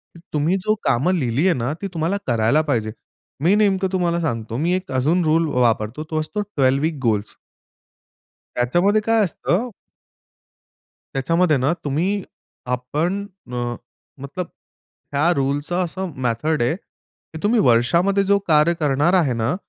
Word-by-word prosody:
की - - -12
तुम्ही 155 +5 +1
जो 215 - +3
कामं 140 +9 +2
लिहिली 135 -1 0
आहे 185 - +4
ना 125 +4 -1
ती 200 - -2
तुम्हाला 165 +4 0
करायला 120 +4 +3
पाहिजे. 110 -5 0 0.5
मी 175 +4 +4
नेमकं 195 -2 +2
तुम्हाला 175 -2 +1
सांगतो 115 -7 -3
मी 165 +6 +1
एक 185 -3 -5
अजून 150 +8 +2
रूल 160 +1 +3
वापरतो 120 +2 +1
तो 155 - 0
असतो 210 +7 -3
12 140 -10 +1
वीक 160 -1 0
गोल. 110 -4 +2 1.3
त्याच्यामध्ये 175 - +2
काय 225 +1 +2
असतं 195 +5 -1 1.5
त्याच्यामध्ये 160 +3 +2
ना 135 +4 +1
तुम्ही, 180 +8 0 0.4
आपण 150 +11 -2 0.3
अ, 120 -1 -2 0.5
मतलब 165 +6 -5 0.7
या 150 +5 +3
रूलचं 145 +6 0
असं 180 +1 -4
मेथड 145 +6 0
आहे 120 +6 +1
की 160 -3 -16
तुम्ही 220 +3 +3
वर्षामध्ये 170 - +3
जो 200 +1 +3
कार्य 155 +1 +4
करणार 150 +3 +2
आहे 165 -9 +3
ना 115 +7 0
155 Hz, 145 wpm, -21 LUFS, 130-180 Hz, 1.5 s, आहे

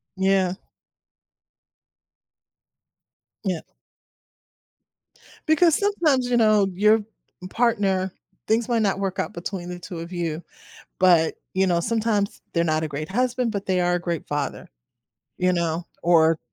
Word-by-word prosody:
Yeah. 190 -1 +2 2.9
Yeah. 185 -5 -1 1.9
Because 315 +1 +4
sometimes, 310 -11 +1
you 240 - +2
know, 215 -3 +4
your 210 +3 +4 0.5
partner 195 -6 +1 0.4
things 225 +2 +1
might 235 -2 +1
not 195 -2 +1
work 195 0 -2
out - - -1
between 175 +1 -6
the 180 - -5
2 175 -1 -8
of 170 +2 -8
you, 170 -2 -3 0.6
but, 175 -3 +4 0.2
you 190 0 +2
know, 170 -1 +2
sometimes 215 -1 -1
they're 170 -1 +2
not 155 -1 +1
a - - -1
great 150 +3 -5
husband, 250 +1 0
but 200 -2 -4
they 185 -1 +1
are 175 0 +2
a - - -1
great 170 -2 -3
father, 145 -1 -4 0.7
you 180 0 +2
know, 170 -1 -1 0.2
or 165 -2 +4
190 Hz, 130 wpm, -23 LUFS, 170-220 Hz, 2.9 s, Because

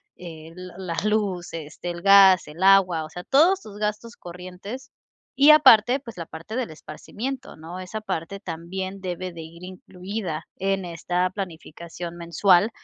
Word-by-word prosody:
eh, 160 -2 -10
l 180 0 -9
la 180 -3 -4
luz, 200 -6 -1
este, 165 +2 -7
el 175 0 -6
gas, 195 -2 +7
el 150 +4 -11
agua, 190 -4 +5
o - - -11
sea, 175 +2 -8
todos 345 - +4
tus 205 - -11
gastos 210 +2 -3
corrientes 185 +9 -9 0.4
y 280 +2 +6
aparte, 260 -4 +7
pues, 240 -4 -11
la 165 -2 -6
parte 165 +7 -8
del 255 -6 -2
esparcimiento, 245 - -7
¿no?, 165 +4 -9
esa 185 +4 -6
parte 200 -2 -5
también 190 +2 -6
debe 185 -1 -5
de 165 - -8
ir 170 +2 -12
incluida 185 -2 -6
en 195 0 -1
esta 175 +1 -1
planificación 170 -2 -7
mensual 175 +4 +3
185 Hz, 160 wpm, -24 LUFS, 170-210 Hz, 0.4 s, gas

